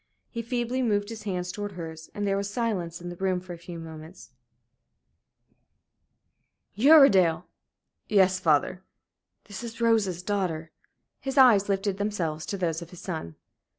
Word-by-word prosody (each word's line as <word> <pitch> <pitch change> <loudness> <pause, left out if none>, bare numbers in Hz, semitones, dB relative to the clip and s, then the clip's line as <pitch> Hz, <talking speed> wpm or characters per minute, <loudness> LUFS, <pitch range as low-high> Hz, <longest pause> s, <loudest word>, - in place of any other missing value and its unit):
He 230 - -4
feebly 240 +2 -2
moved 205 -4 0
his 220 -2 -8
hands 180 -1 -2
towards 205 -1 -6
hers, 160 -2 -8
and 205 - -2
there 195 -1 +1
was 200 0 -2
silence 185 -9 -2
in 175 - -6
the 175 - -7
room 185 -1 0
for 180 0 -9
a - - -8
few 170 0 -9
moments. 160 +1 -11 2.4
"Uredale!" 200 - +6 0.6
"Yes, 190 -3 +4
father." 165 +2 +2 0.6
"This 205 +2 -8
is 230 0 -7
Rose's 215 -7 +2
daughter." 180 -5 -2 0.5
His 270 +1 -5
eyes 220 -7 +6
lifted 195 0 0
themselves 175 -7 -2
to 200 - -3
those 170 -3 -1
of 170 - -9
his 180 - -12
son. 160 - -5
190 Hz, 150 wpm, -27 LUFS, 170-215 Hz, 2.4 s, Uredale